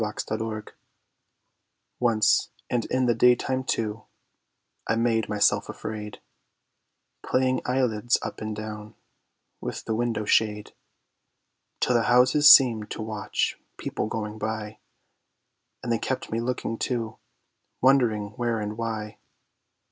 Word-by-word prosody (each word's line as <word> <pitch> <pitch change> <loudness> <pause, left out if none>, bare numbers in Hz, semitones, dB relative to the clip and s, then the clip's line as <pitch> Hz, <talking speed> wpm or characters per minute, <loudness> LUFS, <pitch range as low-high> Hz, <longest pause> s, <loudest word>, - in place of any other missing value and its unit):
Windows 110 +1 -3 1.5
Once, 110 -3 +3 0.2
and 120 -2 0
in 130 0 0
the 120 - +3
daytime 125 +2 +3
too, 110 -4 -2 0.8
I 110 - +1
made 115 -1 +1
myself 105 -1 +2
afraid, 105 -1 -6 1.0
Playing 130 0 +1
Eyelids 125 -2 +1
Up - - -6
and 110 0 -4
Down, 105 0 -7 0.6
with - - -6
the 110 - -1
window 115 -1 -1
shade; 105 -1 +1 1.1
Till 125 - +2
the 115 -2 +2
Houses 130 +4 +7
seemed 115 -6 +6
to 110 - -5
watch 110 -1 -2 0.2
People - - -3
going 110 0 -5
by; 110 0 -4 1.0
And 120 - -2
they 115 - +1
kept 130 - -3
me 115 - -1
looking, 115 -1 -3
too, 115 -3 -3 0.6
wondering 120 -6 +3
where 115 0 -2
and 105 +1 -5
why. 110 -2 -4
115 Hz, 120 wpm, -26 LUFS, 110-120 Hz, 1.5 s, Houses